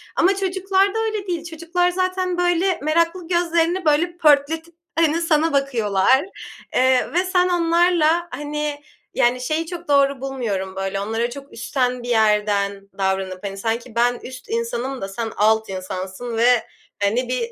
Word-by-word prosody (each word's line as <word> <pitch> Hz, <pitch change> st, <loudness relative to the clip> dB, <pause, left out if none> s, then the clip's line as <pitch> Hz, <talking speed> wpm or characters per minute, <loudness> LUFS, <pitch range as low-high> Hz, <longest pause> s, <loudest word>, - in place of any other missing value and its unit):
ama 380 Hz, +3 st, +3 dB
çocuklarda 385 Hz, +2 st, +1 dB
öyle 430 Hz, -3 st, -3 dB
değil. 345 Hz, -3 st, -2 dB
Çocuklar 340 Hz, +2 st, 0 dB
zaten, 370 Hz, 0 st, -1 dB
böyle, 355 Hz, +1 st, +1 dB
meraklı 335 Hz, +3 st, 0 dB
gözlerini, 345 Hz, 0 st, +1 dB
böyle, 335 Hz, +3 st, +2 dB
pörtletip, 320 Hz, +2 st, +2 dB, 0.2 s
hani, 330 Hz, 0 st, +2 dB
sana 325 Hz, -1 st, +2 dB
bakıyorlar, 255 Hz, -, +2 dB, 0.5 s
eee, 260 Hz, +1 st, +3 dB
ve 355 Hz, +2 st, +2 dB
sen 365 Hz, 0 st, +2 dB
onlarla, 345 Hz, -1 st, +2 dB
hani, 295 Hz, +1 st, -4 dB, 0.3 s
yani, 245 Hz, +1 st, +2 dB
şeyi 310 Hz, +6 st, -1 dB
çok 345 Hz, 0 st, -8 dB
doğru 280 Hz, -2 st, +3 dB
bulmuyorum, 215 Hz, -9 st, -3 dB
böyle, 195 Hz, 0 st, -2 dB
onlara 225 Hz, +4 st, -1 dB
çok 275 Hz, +3 st, -10 dB
üstten 250 Hz, +1 st, -1 dB
bir 245 Hz, -, -6 dB
yerden 205 Hz, -3 st, +1 dB
davranıp, 190 Hz, -1 st, -2 dB
hani, 195 Hz, 0 st, -5 dB
sanki 230 Hz, +3 st, -3 dB
ben 240 Hz, +1 st, +2 dB
üst 255 Hz, +5 st, -10 dB
insanım 275 Hz, -, -3 dB
da 195 Hz, -, -3 dB
sen 225 Hz, +3 st, -4 dB
alt 220 Hz, +1 st, +3 dB
insansın 190 Hz, +5 st, -5 dB
ve, 240 Hz, 0 st, +4 dB, 0.4 s
hani, 240 Hz, +5 st, +1 dB
bir 240 Hz, -2 st, -2 dB
280 Hz, 145 wpm, -21 LUFS, 230-345 Hz, 0.5 s, ve